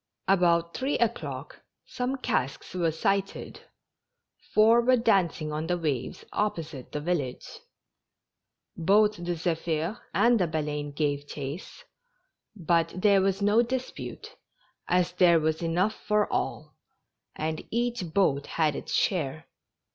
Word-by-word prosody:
About 170 -3 +3
three 270 +3 0
o'clock 235 - -3 0.2
some 250 +2 -2
casks 140 - -2
were 175 -3 +1
sighted 195 +4 -2 0.4
— - - -35
four 225 +2 +6
were 255 +2 +4
dancing 185 -9 +1
on 155 +2 -3
the 175 0 0
waves 145 -7 -3
opposite 160 -10 -3
the 150 - -3
village. 145 -6 -2 1.3
Both 210 +5 +3
the 175 0 -3
Zephir 165 +3 -2
and 235 -1 +4
the 180 - +2
Baleine 150 -2 -2
gave 145 -1 -1
chase, 145 +5 -7 0.7
but 170 -3 +1
there 200 0 +5
was 195 +1 0
no 210 +3 +5
dis^mte, 255 +1 -5 0.6
as 180 0 +2
there 175 -2 +5
was 160 +1 0
enough 175 +6 +1
for 210 -1 +1
all, - - -2 0.6
and 155 0 -3
each 235 -6 -2
boat 145 -6 +2
had 155 -3 +1
its - - -4
share. 155 -5 0
175 Hz, 125 wpm, -27 LUFS, 155-210 Hz, 1.3 s, four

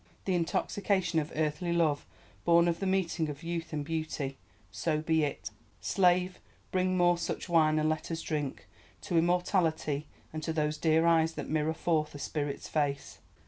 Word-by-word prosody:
The 190 - +1
intoxication 180 +1 0
of 155 +1 -4
earthly 155 +3 -1
love 160 -4 +1 0.4
born 170 0 +5
of 170 -1 0
the 195 - -1
meeting 180 -4 0
of 145 +2 -7
youth 170 0 -4
and 150 -2 -3
beauty. 155 -4 -3 0.3
So 155 -2 -1
be 160 0 +2
it! 145 - -3 0.3
Slave, 180 -1 +2 0.3
bring 185 0 +1
more 175 -1 +4
such 170 - -3
wine 155 -3 +4
and 155 0 +2
let 155 0 -1
us 165 -1 -3
drink—to 150 +3 -4
Immortality 165 -4 +1 0.3
and 155 - -4
to 160 - -2
those 150 -1 -1
dear 160 0 +3
eyes 165 -1 +4
that - - -6
mirror 155 +1 +1
forth 155 -3 0
a - - -5
spirit's 145 0 -3
face! 145 -2 -2
160 Hz, 165 wpm, -30 LUFS, 155-175 Hz, 0.4 s, born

